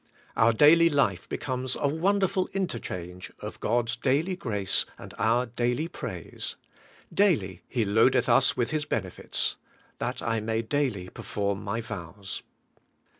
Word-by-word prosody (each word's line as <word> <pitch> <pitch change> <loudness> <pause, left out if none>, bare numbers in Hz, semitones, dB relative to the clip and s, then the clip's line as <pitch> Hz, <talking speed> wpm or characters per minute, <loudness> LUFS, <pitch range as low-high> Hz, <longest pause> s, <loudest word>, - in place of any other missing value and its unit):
Our 115 +1 +5
daily 160 +7 +7
life 135 - +1
becomes 130 -1 -2
a 145 - +1
wonderful 190 +4 +1
interchange 90 - -4
of - - -7
God's 115 0 +1
daily 140 +9 +1
grace 105 - 0
and - - -10
our 120 +3 +3
daily 120 +5 -1
praise: 170 - -5 0.6
'Daily 105 - +2
He 120 -4 0
loadeth 115 +5 +4
us 135 - +4
with 120 -1 0
His 155 -1 0
benefits;' 95 -9 -2 0.4
'that 125 +1 -3
I 115 -1 +1
may 110 +1 -1
daily 115 -8 -1
perform 100 +1 -3
my 110 +3 -2
vows.' 100 -2 -6
120 Hz, 130 wpm, -28 LUFS, 105-145 Hz, 0.6 s, daily